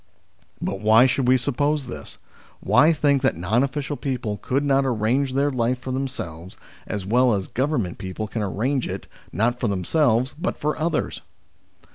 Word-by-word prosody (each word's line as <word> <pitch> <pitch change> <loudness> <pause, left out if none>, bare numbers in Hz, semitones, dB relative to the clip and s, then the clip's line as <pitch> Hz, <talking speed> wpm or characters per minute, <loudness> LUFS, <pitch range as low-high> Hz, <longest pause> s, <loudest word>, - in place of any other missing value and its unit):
But 95 - -3
why 110 +4 +6
should 130 0 +1
we 130 +1 +6
suppose 145 +3 0
this? 125 - -6 0.4
Why 155 +3 +4
think 145 -3 +2
that 130 -8 +1
non 100 +8 +1
official 140 +1 -2
people 125 -7 -3
could 135 +6 -1
not 140 -1 +3
arrange 130 +2 0
their 140 +1 +2
life 125 0 0
for 130 +1 -6
themselves, 95 - -5 0.3
as 105 -3 -4
well 120 +2 +3
as 95 -2 -2
Government 130 - -1
people 95 +3 -4
can 110 +1 -4
arrange 120 +7 -1
it - - -5 0.3
not 120 +4 0
for 120 - 0
themselves 120 - +1
but 160 - -3
for 150 +1 -1
others 160 0 -2
125 Hz, 165 wpm, -23 LUFS, 110-140 Hz, 0.4 s, why